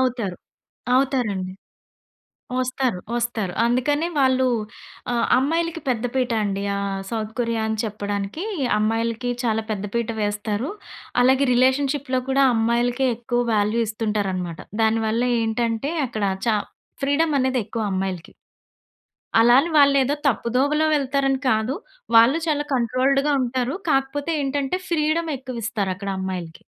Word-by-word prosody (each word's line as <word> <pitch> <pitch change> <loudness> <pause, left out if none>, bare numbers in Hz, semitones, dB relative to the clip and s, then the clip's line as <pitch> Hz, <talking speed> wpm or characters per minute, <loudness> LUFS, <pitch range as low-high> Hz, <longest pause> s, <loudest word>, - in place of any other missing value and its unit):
అవుతారు. 235 -8 -1 0.6
అవుతారండి. 220 -9 0 1.1
ఒస్తారు. 255 -6 -1 0.2
ఒస్తారు. 225 -6 -2
అందుకనే 275 +7 +1
వాళ్ళు 260 -1 +3 0.7
ఆహ్, 235 -1 +1
అమ్మాయిలకి 330 +4 0
పెద్ద 245 -2 0
పీట 250 -2 +1
అండి. 200 -1 -2
ఆహ్, 200 -1 -2
సౌత్ 220 -1 -3
కొరియా 230 -2 0
అని 220 0 -1
చెప్పడానికి, 205 - -3 0.4
అమ్మాయిలకి 225 +3 0
చాలా 225 -1 0
పెద్ద 205 0 -3
పీట 235 -1 0
వేస్తారు. 205 +4 -2 0.5
అలాగే 265 +2 +4
రిలేషన్‌షిప్‌లో 260 +1 +2
కూడా 275 +1 +4
అమ్మాయిలకే 240 +3 +1
ఎక్కువ 240 0 -1
వాల్యూ 210 +3 +1
ఇస్తుంటారన్నమాట. 200 -6 -2 0.2
దాని 220 0 +2
వల్ల 225 +2 +1 0.2
ఏంటంటే, 230 +4 -1
అక్కడ 220 -4 -4 0.2
చా 220 - +3 0.5
ఫ్రీడమనేది 275 -3 +2
ఎక్కువ 225 -1 -3
అమ్మాయిలకి. 185 -3 -3 1.1
అలా 240 +2 +6
అని 335 +3 -3
వాళ్ళేదో 280 -1 +5
తప్పుదోవలో 275 +5 +2
వెళ్తారని 275 -1 +1
కాదు. 220 +5 +1 0.4
వాళ్ళు 235 +7 +6
చాలా 295 -1 0
కంట్రోల్డ్‌గా 260 +4 +2
ఉంటారు. 250 +3 -1
కాకపోతే 275 +3 0
ఏంటంటే, 280 +4 -1
ఫ్రీడమ్ 320 0 +1
ఎక్కువిస్తారు 230 -6 -3
అక్కడ 200 0 -5
అమ్మాయిలకి. 180 -3 -5
240 Hz, 115 wpm, -23 LUFS, 215-270 Hz, 1.1 s, అలా